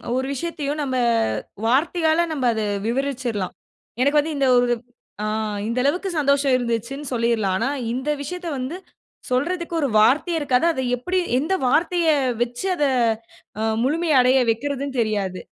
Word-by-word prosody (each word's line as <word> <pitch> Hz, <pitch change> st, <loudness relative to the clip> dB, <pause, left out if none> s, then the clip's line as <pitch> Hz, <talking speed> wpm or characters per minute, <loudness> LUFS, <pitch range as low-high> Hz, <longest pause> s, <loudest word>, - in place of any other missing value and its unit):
ஒரு 260 Hz, +1 st, 0 dB
விஷயத்தயோ 290 Hz, 0 st, -3 dB
நம்ம 260 Hz, -2 st, -2 dB, 0.7 s
வார்த்தையால 320 Hz, +5 st, +2 dB
நம்ப 270 Hz, -5 st, -2 dB
அத 220 Hz, -, -2 dB, 0.3 s
விவரிச்சிரலாம். 245 Hz, -6 st, -2 dB, 0.5 s
எனக்கு 285 Hz, +3 st, +4 dB
வந்து 310 Hz, +1 st, -1 dB
இந்த 270 Hz, -1 st, +2 dB
ஒரு 245 Hz, 0 st, +3 dB, 0.6 s
அ -, -, -1 dB, 0.4 s
இந்த 235 Hz, +2 st, -2 dB
அளவுக்கு 360 Hz, +7 st, 0 dB
சந்தோஷம் 280 Hz, -1 st, +2 dB
இருந்துச்சுன்னு 245 Hz, +4 st, -3 dB
சொல்லிரலாம். 230 Hz, -5 st, +1 dB
ஆனா, 270 Hz, -, 0 dB, 0.2 s
இந்த 260 Hz, +4 st, -3 dB
விஷயத்த 360 Hz, +4 st, -6 dB
வந்து 260 Hz, +8 st, -4 dB, 0.5 s
சொல்றதுக்கு 340 Hz, +6 st, -1 dB
ஒரு 280 Hz, -, +1 dB
வார்த்தையே 310 Hz, -, +3 dB
இருக்காது 275 Hz, +1 st, +1 dB
அத 260 Hz, -, -3 dB, 0.2 s
எப்டி, 365 Hz, +9 st, -1 dB, 0.2 s
எந்த 320 Hz, +7 st, -1 dB
வார்த்தைய 335 Hz, +4 st, +2 dB, 0.3 s
வச்சு, 245 Hz, +8 st, -2 dB
அத 295 Hz, -, -1 dB, 0.8 s
அ -, -, -2 dB, 0.2 s
முழுமை 325 Hz, +3 st, 0 dB
அடைய 255 Hz, +1 st, +4 dB
வைக்கிறதுன்னு 275 Hz, +1 st, -3 dB
தெரியாது. 200 Hz, -4 st, -1 dB
275 Hz, 140 wpm, -22 LUFS, 245-315 Hz, 0.8 s, எனக்கு